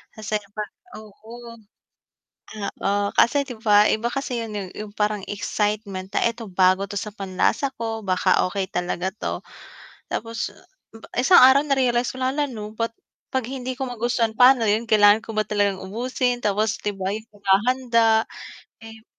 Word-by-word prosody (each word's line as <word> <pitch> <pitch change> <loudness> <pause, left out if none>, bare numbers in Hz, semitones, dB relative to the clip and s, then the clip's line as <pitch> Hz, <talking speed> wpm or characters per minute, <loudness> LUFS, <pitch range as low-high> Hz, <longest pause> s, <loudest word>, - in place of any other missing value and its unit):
Kasi 215 -1 -4
'di 200 - -22
ba 210 +1 -4 0.4
oo. 230 +3 -12 1.3
Oo, 200 +1 +1
kasi 280 +4 +4
'di 245 - -6
ba 210 -1 +6
iba 230 +2 0
kasi 275 -3 -3
'yun 220 - -8
'yung 195 -3 -5
'yung 210 -1 -7
parang 210 -2 0
excitement 205 -2 -3
na - - +1
eto 235 0 -6
bago 185 +1 +3
ito 205 - -7
sa - - -5
panlasa 195 +8 -1
ko, 225 -1 -3
baka 185 0 +2 0.2
okey 195 -1 -2
talaga 180 +1 -2
'to. - - -4 0.7
Tapos, 230 0 -3 0.7
isang 350 +9 +7
araw 265 +2 +7
na-realize 250 -3 +1
ko - - -8
lang, 260 +2 -1
hala 295 - +2
'no 210 -3 -7
ba't 230 +1 -2 0.4
'pag 260 -1 0
hindi 260 -1 -4
ko 265 +1 -4
magustuhan 235 -1 0
paano 250 -1 +6
'yun, 215 +2 +1
kailangan 210 -1 +6
ko - - -6
ba 215 - +2
talagang 205 -2 0
ubusin 245 +4 -1
tapos 210 +1 +1
'di 210 - -1
ba 190 0 -2
'yung 220 +1 -7
paghahanda, 225 +3 +2 0.6
eh 225 0 -12
220 Hz, 165 wpm, -23 LUFS, 205-240 Hz, 1.3 s, isang